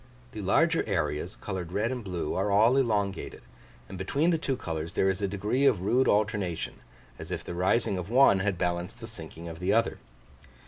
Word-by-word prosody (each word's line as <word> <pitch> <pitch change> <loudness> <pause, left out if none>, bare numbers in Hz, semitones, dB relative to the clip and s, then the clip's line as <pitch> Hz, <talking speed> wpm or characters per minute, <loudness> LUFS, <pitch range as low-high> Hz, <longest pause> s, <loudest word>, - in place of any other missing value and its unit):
The 110 - -6
larger 165 - +3
areas, 85 -2 -1
coloured 90 -4 -5
red 110 +6 0
and 125 -2 -4
blue, 90 -5 -3
are 95 +2 0
all 110 +5 +5
elongated; 105 -7 -1 0.4
and 95 - -8
between 145 - +1
the 165 - +1
two 135 -4 -1
colours 80 -5 -4
there 95 - +2
is 95 - -5
a 100 - +1
degree 105 +8 +1
of 105 -9 +2
rude 125 +6 +3
alternation, 105 -5 0 0.4
as - - -8
if - - -4
the - - -6
rising 95 +2 +1
of 90 +2 -6
one 120 -5 +5
had 95 -1 0
balanced 90 +4 -2
the 115 - -7
sinking 85 -6 -9
of 80 0 -8
the 90 +2 +1
other. 115 0 +1
100 Hz, 195 wpm, -28 LUFS, 90-115 Hz, 0.4 s, all